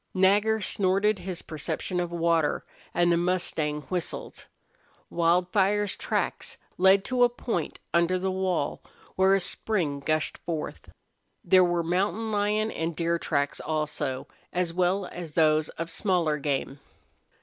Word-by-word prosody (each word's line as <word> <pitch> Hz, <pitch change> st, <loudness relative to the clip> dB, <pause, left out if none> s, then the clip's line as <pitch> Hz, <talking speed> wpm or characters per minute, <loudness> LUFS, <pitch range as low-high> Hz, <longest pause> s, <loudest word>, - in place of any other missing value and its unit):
Nagger 205 Hz, +4 st, +3 dB
snorted 195 Hz, +1 st, +2 dB
his 180 Hz, -1 st, -5 dB
perception 165 Hz, +3 st, -3 dB
of 175 Hz, -1 st, -2 dB
water, 165 Hz, -2 st, +1 dB, 0.3 s
and 175 Hz, 0 st, +2 dB
the 170 Hz, -, +3 dB
mustang 170 Hz, -4 st, 0 dB
whistled. 175 Hz, +4 st, -5 dB, 0.6 s
Wildfire's 185 Hz, +4 st, +2 dB
tracks -, -, -2 dB, 0.2 s
led 190 Hz, +1 st, +5 dB
to 250 Hz, -1 st, +2 dB
a 245 Hz, -, +6 dB
point 235 Hz, -8 st, -3 dB, 0.2 s
under 170 Hz, +2 st, +3 dB
the 190 Hz, +1 st, -1 dB
wall 185 Hz, -5 st, -1 dB, 0.3 s
where 190 Hz, +1 st, +4 dB
a -, -, +2 dB
spring 175 Hz, -6 st, 0 dB
gushed 155 Hz, +2 st, -1 dB
forth. 160 Hz, -2 st, -5 dB, 0.5 s
There 185 Hz, -1 st, +6 dB
were 175 Hz, -1 st, +1 dB
mountain 195 Hz, +6 st, 0 dB
lion 210 Hz, +1 st, +1 dB
and 165 Hz, 0 st, -3 dB
deer 170 Hz, +1 st, 0 dB
tracks 140 Hz, -2 st, -1 dB
also, 150 Hz, -4 st, -3 dB, 0.2 s
as 175 Hz, -2 st, -1 dB
well 185 Hz, +2 st, +1 dB
as 170 Hz, -4 st, -8 dB
those 155 Hz, -1 st, +3 dB
of 165 Hz, +1 st, -6 dB
smaller 170 Hz, -7 st, +1 dB
game. 140 Hz, -1 st, -2 dB
175 Hz, 135 wpm, -27 LUFS, 160-190 Hz, 0.6 s, a